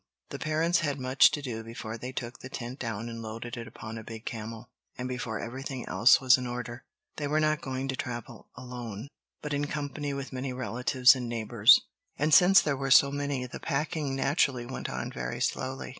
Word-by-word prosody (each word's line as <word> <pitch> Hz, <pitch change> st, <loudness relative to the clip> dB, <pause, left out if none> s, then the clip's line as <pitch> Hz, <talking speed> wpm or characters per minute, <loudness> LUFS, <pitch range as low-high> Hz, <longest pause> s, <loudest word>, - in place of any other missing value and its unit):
The -, -, -6 dB
parents 160 Hz, +3 st, +1 dB
had 145 Hz, -3 st, -1 dB
much 130 Hz, +1 st, +5 dB
to 145 Hz, -, -4 dB
do 115 Hz, -4 st, -4 dB
before 115 Hz, 0 st, -6 dB
they 125 Hz, +3 st, -6 dB
took 120 Hz, -2 st, -6 dB
the 130 Hz, -, -9 dB
tent 125 Hz, +1 st, -6 dB
down 115 Hz, -1 st, -4 dB
and 115 Hz, -1 st, -6 dB
loaded 115 Hz, +2 st, -6 dB
it 115 Hz, -1 st, -7 dB
upon 110 Hz, +1 st, -8 dB
a -, -, -9 dB
big 110 Hz, +1 st, -9 dB
camel, 115 Hz, 0 st, -6 dB, 0.3 s
and 125 Hz, -, -3 dB
before 120 Hz, -3 st, -3 dB
everything 130 Hz, +1 st, -6 dB
else 115 Hz, -, +6 dB
was 130 Hz, -2 st, +5 dB
in 125 Hz, -, -4 dB
order. 120 Hz, 0 st, -5 dB, 0.4 s
They 145 Hz, -, -2 dB
were 150 Hz, +2 st, +2 dB
not 155 Hz, 0 st, +1 dB
going 130 Hz, 0 st, -3 dB
to 135 Hz, -, -1 dB
travel 120 Hz, -2 st, -6 dB
alone, 125 Hz, -2 st, -7 dB, 0.3 s
but 150 Hz, -1 st, -3 dB
in 145 Hz, 0 st, 0 dB
company 145 Hz, 0 st, -3 dB
with 140 Hz, -1 st, -6 dB
many 130 Hz, 0 st, -3 dB
relatives 125 Hz, 0 st, +4 dB
and 125 Hz, -2 st, -4 dB
neighbors. 115 Hz, 0 st, +5 dB, 0.4 s
And 150 Hz, +2 st, +1 dB
since 185 Hz, +4 st, +8 dB
there 150 Hz, -2 st, 0 dB
were 135 Hz, 0 st, -3 dB
so 140 Hz, +1 st, +7 dB
many, 140 Hz, -2 st, -2 dB
the 125 Hz, -, -8 dB
packing 145 Hz, -1 st, -2 dB
naturally 135 Hz, -2 st, +1 dB
went 130 Hz, -, -5 dB
on -, -, -4 dB
very -, -, -4 dB
slowly. 130 Hz, +1 st, -2 dB
130 Hz, 205 wpm, -29 LUFS, 120-140 Hz, 0.4 s, since